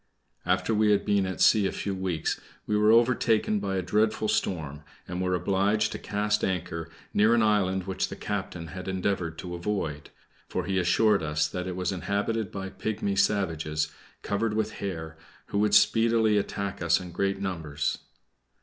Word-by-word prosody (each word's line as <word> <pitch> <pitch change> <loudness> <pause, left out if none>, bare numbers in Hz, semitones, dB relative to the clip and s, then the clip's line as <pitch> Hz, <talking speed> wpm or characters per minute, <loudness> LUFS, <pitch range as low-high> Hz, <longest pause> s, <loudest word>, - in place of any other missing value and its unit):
After 115 - +1
we 105 0 +3
had 100 -1 +3
been 100 -2 +2
at 95 - -4
sea 105 -3 +5
a - - -2
few 100 - -3
weeks, 95 -4 -2 0.2
we 105 - 0
were 105 +1 +5
overtaken 115 -2 +3
by 100 -1 -2
a 95 - -1
dreadful 105 +4 +1
storm, 75 -8 -1 0.3
and 90 +1 -4
were 90 0 +1
obliged 100 +3 +1
to - - -5
cast 105 +1 -1
anchor 85 -3 -2 0.2
near 110 +3 +4
an 115 - +3
island 95 -3 +2
which 95 -1 -1
the - - -6
captain 85 -1 -4
had 95 +2 -7
endeavored 95 -3 -1
to 90 -1 -6
avoid; 85 -5 -3 0.4
for - - -2
he 95 -1 0
assured 100 +4 +3
us 75 0 0
that 90 +3 -4
it 90 - -4
was 90 0 -1
inhabited 100 +3 -1
by 95 -1 -5
pigmy 100 -1 -2
savages, 80 -6 0 0.3
covered 105 +1 -1
with 110 0 0
hair, 80 -5 -5 0.3
who 100 - 0
would 105 0 +3
speedily 115 0 +4
attack 100 -1 -4
us 85 0 +3
in 90 -2 -8
great 100 +2 -1
numbers. 80 -7 -2
95 Hz, 175 wpm, -27 LUFS, 90-105 Hz, 0.4 s, sea